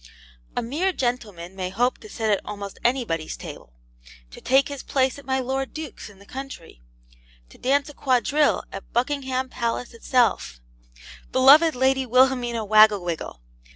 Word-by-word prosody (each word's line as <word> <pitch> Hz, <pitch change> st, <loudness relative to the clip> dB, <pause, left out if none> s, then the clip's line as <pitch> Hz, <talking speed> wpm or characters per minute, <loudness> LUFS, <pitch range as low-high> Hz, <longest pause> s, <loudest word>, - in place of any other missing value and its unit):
A -, -, 0 dB
mere 320 Hz, +11 st, -1 dB
gentleman 210 Hz, -, -3 dB
may 185 Hz, -1 st, -3 dB
hope 245 Hz, +7 st, 0 dB
to 430 Hz, -, -13 dB
sit 220 Hz, -, -1 dB
at 200 Hz, -, +1 dB
almost 200 Hz, -1 st, -7 dB
anybody's 235 Hz, -11 st, -1 dB
table -, -, -10 dB, 0.6 s
to -, -, -12 dB
take 270 Hz, +1 st, +3 dB
his 280 Hz, -2 st, -6 dB
place 265 Hz, 0 st, 0 dB
at 280 Hz, -, -16 dB
my 265 Hz, 0 st, +1 dB
lord 265 Hz, +1 st, -3 dB
duke's 310 Hz, -8 st, -7 dB
in 200 Hz, -, -17 dB
the 200 Hz, -, -17 dB
country 260 Hz, -, -9 dB, 0.7 s
to -, -, -18 dB
dance 280 Hz, +3 st, +1 dB
a 295 Hz, -, -10 dB
quadrille 275 Hz, +3 st, +1 dB
at 195 Hz, -, -9 dB
Buckingham 260 Hz, +1 st, -1 dB
Palace 240 Hz, 0 st, -3 dB
itself 230 Hz, -, 0 dB, 0.7 s
(beloved 285 Hz, +5 st, +6 dB
Lady 265 Hz, +1 st, +1 dB
Wilhelmina 245 Hz, -2 st, +2 dB
Wagglewiggle! 200 Hz, -, +3 dB
250 Hz, 150 wpm, -24 LUFS, 210-270 Hz, 0.7 s, beloved